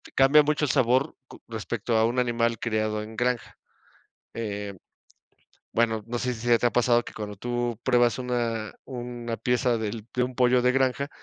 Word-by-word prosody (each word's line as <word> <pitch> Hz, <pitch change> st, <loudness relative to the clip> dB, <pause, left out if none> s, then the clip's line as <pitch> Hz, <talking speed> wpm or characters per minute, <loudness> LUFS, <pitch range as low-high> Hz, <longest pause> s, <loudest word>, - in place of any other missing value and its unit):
cambia 140 Hz, +3 st, +6 dB
mucho 150 Hz, 0 st, +1 dB
el -, -, +1 dB
sabor 130 Hz, +2 st, +2 dB
co -, -, -14 dB
respecto 115 Hz, 0 st, -2 dB
a 110 Hz, -, +4 dB
un 120 Hz, +2 st, 0 dB
animal 115 Hz, -1 st, +1 dB
criado 110 Hz, -2 st, -1 dB
en 110 Hz, +1 st, -10 dB
granja. 120 Hz, +1 st, -1 dB, 0.8 s
Eh, 105 Hz, -3 st, -4 dB, 1.0 s
bueno, 110 Hz, -2 st, +1 dB
no 120 Hz, 0 st, -3 dB
sé 125 Hz, -1 st, -1 dB
si 110 Hz, -, -9 dB
se 120 Hz, -1 st, +3 dB
te -, -, 0 dB
ha -, -, -1 dB
pasado 120 Hz, -1 st, +3 dB
que -, -, -10 dB
cuando 105 Hz, -1 st, -6 dB
tú 120 Hz, 0 st, -2 dB
pruebas 120 Hz, -1 st, +3 dB
una 115 Hz, -3 st, -2 dB
una 120 Hz, -2 st, -5 dB
pieza 125 Hz, -1 st, +1 dB
del 110 Hz, 0 st, -4 dB
de 125 Hz, -, +1 dB
un 125 Hz, 0 st, -4 dB
pollo 125 Hz, -1 st, +4 dB
de 125 Hz, +1 st, +3 dB
granja, 135 Hz, +2 st, +1 dB
120 Hz, 180 wpm, -26 LUFS, 115-125 Hz, 1.0 s, cambia